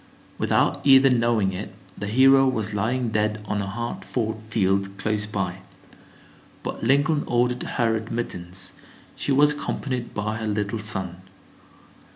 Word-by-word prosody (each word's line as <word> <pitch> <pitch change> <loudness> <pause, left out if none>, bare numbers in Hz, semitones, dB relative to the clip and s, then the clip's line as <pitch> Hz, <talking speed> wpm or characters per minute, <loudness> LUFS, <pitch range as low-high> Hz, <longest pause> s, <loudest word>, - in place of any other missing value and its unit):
Without - - +1
either 135 -1 +7
knowing 115 -5 +2
it, 95 +1 -6 0.2
the 105 - -5
hero 135 +4 +5
was 110 -5 -1
lying 115 +4 0
dead 105 0 0
on 105 -1 -1
a 100 - -4
hard 120 +4 -4
fought 110 -3 -3
field 100 -3 0
close 105 0 -1
by. 95 -3 -3 1.0
But - - -5
Lincoln 145 +5 +3
ordered 125 +1 +1
her 115 -3 0
admittance. 95 -5 -3 0.4
She - - -2
was 145 +2 +5
accompanied 130 -4 -4
by 105 +1 -2
her 110 -1 -4
little 105 +1 -1
son. 95 -4 -3
110 Hz, 140 wpm, -24 LUFS, 100-125 Hz, 1.0 s, either